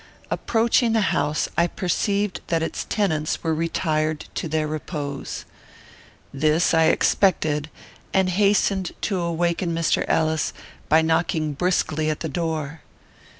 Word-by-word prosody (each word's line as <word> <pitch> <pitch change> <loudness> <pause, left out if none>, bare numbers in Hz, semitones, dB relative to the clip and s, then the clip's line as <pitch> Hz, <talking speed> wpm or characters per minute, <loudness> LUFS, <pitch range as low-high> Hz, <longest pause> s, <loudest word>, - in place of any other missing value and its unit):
Approaching 230 0 +2
the 220 -3 +2
house, 150 +1 0
I 170 - +3
perceived 200 +2 -1
that 165 -1 0
its - - -3
tenants 160 -8 -1
were 160 -1 +1
retired 155 -1 -1
to - - -3
their 155 0 0
repose. 150 -2 -5 0.9
This 155 +5 +2
I 160 0 +5
expected, 155 -3 +2 0.4
and 190 -1 +2
hastened 195 -1 +2
to 195 -3 -1
awaken 170 0 0
Mr. 165 -1 +1
Ellis, 160 -1 +1 0.4
by 160 +1 +5
knocking 160 -1 +1
briskly 155 -1 0
at 155 - -3
the 160 - -2
door. 160 -1 -3
160 Hz, 125 wpm, -23 LUFS, 155-180 Hz, 0.9 s, I